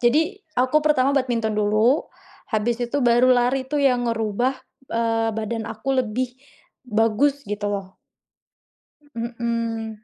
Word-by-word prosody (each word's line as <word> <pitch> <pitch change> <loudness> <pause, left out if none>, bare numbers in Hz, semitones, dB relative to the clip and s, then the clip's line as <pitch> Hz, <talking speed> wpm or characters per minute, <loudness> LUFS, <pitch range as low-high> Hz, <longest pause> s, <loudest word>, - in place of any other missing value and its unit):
jadi 320 - +2 0.2
aku 255 +4 +2
pertama 280 -3 +3
badminton 240 -5 0
dulu, 215 +6 +2 0.4
habis 220 +2 +1
itu 240 +4 -2
baru 240 +1 +5
lari 260 +2 +1
itu 295 - -2
yang 250 -4 +2
ngerubah, 230 +3 0 0.3
eee, 225 0 0
badan 220 0 -3
aku 220 +5 -7
lebih, 250 +2 -2 0.6
bagus 230 +6 +2
gitu 205 0 -3
loh. 195 -2 -5 1.2
Mhm. 230 -2 -3
235 Hz, 120 wpm, -23 LUFS, 220-255 Hz, 1.2 s, baru